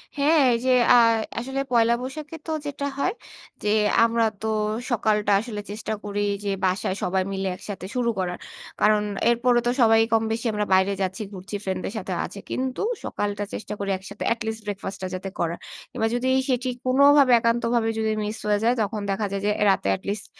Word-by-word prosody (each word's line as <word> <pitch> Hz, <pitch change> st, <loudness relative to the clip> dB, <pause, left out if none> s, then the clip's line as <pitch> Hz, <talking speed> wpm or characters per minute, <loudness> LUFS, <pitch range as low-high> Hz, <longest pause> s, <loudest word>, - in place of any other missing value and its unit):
হ্যাঁ, 300 Hz, +2 st, +3 dB
এই -, -, +2 dB
যে -, -, +2 dB, 0.3 s
আর 230 Hz, -1 st, +6 dB, 0.3 s
আসলে 265 Hz, +3 st, -4 dB
পয়লা 235 Hz, -1 st, +4 dB
বৈশাখে 295 Hz, +5 st, -6 dB
তো -, -, -2 dB
যেটা 285 Hz, -1 st, -4 dB
হয়, 365 Hz, +7 st, 0 dB, 0.5 s
যে -, -, -2 dB, 0.4 s
আমরা 230 Hz, 0 st, +2 dB, 0.2 s
তো 220 Hz, -, -2 dB, 0.4 s
সকালটা 210 Hz, -2 st, +1 dB
আসলে 210 Hz, -1 st, -5 dB
চেষ্টা 215 Hz, +1 st, -4 dB
করি 205 Hz, 0 st, -3 dB, 0.2 s
যে, 205 Hz, -, -2 dB, 0.2 s
বাসায় 185 Hz, 0 st, 0 dB
সবাই 190 Hz, +1 st, +1 dB
মিলে 195 Hz, 0 st, -2 dB
একসাথে 195 Hz, 0 st, -7 dB
শুরু 245 Hz, -2 st, +1 dB
করার। 180 Hz, -1 st, -2 dB, 0.4 s
কারণ 210 Hz, 0 st, +4 dB, 0.3 s
এরপরেও 240 Hz, +1 st, +3 dB
তো -, -, +3 dB
সবাই 225 Hz, -1 st, +6 dB
কম 225 Hz, -1 st, +3 dB
বেশি 225 Hz, +2 st, -3 dB
আমরা 210 Hz, 0 st, 0 dB
বাইরে 190 Hz, +1 st, +4 dB
যাচ্ছি, 190 Hz, +2 st, -2 dB
ঘুরছি 190 Hz, +2 st, -7 dB
ফ্রেন্ডদের 190 Hz, +1 st, -3 dB
সাথেও 185 Hz, -3 st, -3 dB
আছে। 200 Hz, -, -9 dB
কিন্তু 260 Hz, 0 st, -2 dB, 0.2 s
সকালটা 205 Hz, 0 st, -2 dB
চেষ্টা 210 Hz, -, -5 dB
করি 200 Hz, 0 st, -3 dB
একসাথে, 200 Hz, +2 st, -8 dB
at 230 Hz, -, -13 dB
least 220 Hz, 0 st, -4 dB
breakfast 200 Hz, -1 st, -5 dB
টা -, -, -1 dB
যাতে 190 Hz, +1 st, -5 dB
করার। 170 Hz, 0 st, -1 dB, 0.3 s
কিংবা 225 Hz, -, 0 dB
যদি 245 Hz, +1 st, -1 dB, 0.2 s
সেটি 255 Hz, 0 st, 0 dB, 0.2 s
কোনভাবে, 280 Hz, +1 st, +6 dB
একান্তভাবে 230 Hz, 0 st, +1 dB
যদি 220 Hz, 0 st, 0 dB
মিস 210 Hz, +1 st, -4 dB
হয়ে 210 Hz, -1 st, +2 dB
যায়, 235 Hz, +2 st, +4 dB
তখন 210 Hz, 0 st, -2 dB
দেখা 205 Hz, +2 st, -1 dB
যায় 200 Hz, 0 st, -2 dB
যে -, -, +2 dB
এ -, -, +5 dB
রাতে 190 Hz, -, -1 dB
at -, -, -23 dB
least 205 Hz, +1 st, -3 dB
220 Hz, 190 wpm, -24 LUFS, 200-240 Hz, 0.5 s, আর